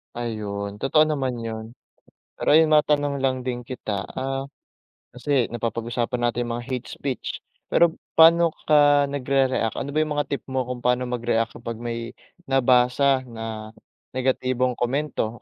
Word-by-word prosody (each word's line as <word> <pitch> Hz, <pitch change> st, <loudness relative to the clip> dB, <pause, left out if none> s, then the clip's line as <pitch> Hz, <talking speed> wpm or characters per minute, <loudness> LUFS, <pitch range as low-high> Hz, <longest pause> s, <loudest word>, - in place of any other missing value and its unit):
Ayun, 105 Hz, -3 st, -4 dB
totoo 155 Hz, +6 st, +4 dB
naman 140 Hz, -5 st, -1 dB
yun. 110 Hz, -1 st, -5 dB, 0.7 s
Pero -, -, -4 dB
ayun 155 Hz, +1 st, +6 dB
matanong 145 Hz, -2 st, +2 dB
lang 130 Hz, -1 st, 0 dB
din 125 Hz, -1 st, -2 dB
kita, 110 Hz, -5 st, -4 dB, 0.2 s
ah, 135 Hz, +1 st, -2 dB, 0.7 s
kasi 125 Hz, 0 st, 0 dB
napapag-usapan 120 Hz, +1 st, -2 dB
natin 120 Hz, 0 st, -3 dB
mga 120 Hz, 0 st, -3 dB
hate 125 Hz, -1 st, -4 dB
speech. 135 Hz, -3 st, -5 dB, 0.3 s
Pero 170 Hz, -1 st, +4 dB, 0.2 s
paano 165 Hz, 0 st, +6 dB, 0.2 s
ka 145 Hz, -1 st, +6 dB
nagre-react? 135 Hz, -4 st, 0 dB
Ano 140 Hz, -, -4 dB
ba 150 Hz, -, -3 dB
yung 155 Hz, -1 st, 0 dB
mga 145 Hz, -, 0 dB
tip 140 Hz, -, -3 dB
mo 130 Hz, -1 st, -1 dB
kung 125 Hz, 0 st, -5 dB
pano 125 Hz, +1 st, +1 dB
mag-react 115 Hz, -2 st, -1 dB
kapag 115 Hz, -, -5 dB
may 115 Hz, -1 st, -4 dB, 0.3 s
nabasa 130 Hz, +1 st, +3 dB
na 110 Hz, -1 st, -7 dB, 0.4 s
negatibong 130 Hz, -1 st, 0 dB
komento 120 Hz, -3 st, -2 dB
125 Hz, 140 wpm, -24 LUFS, 120-140 Hz, 0.7 s, ayun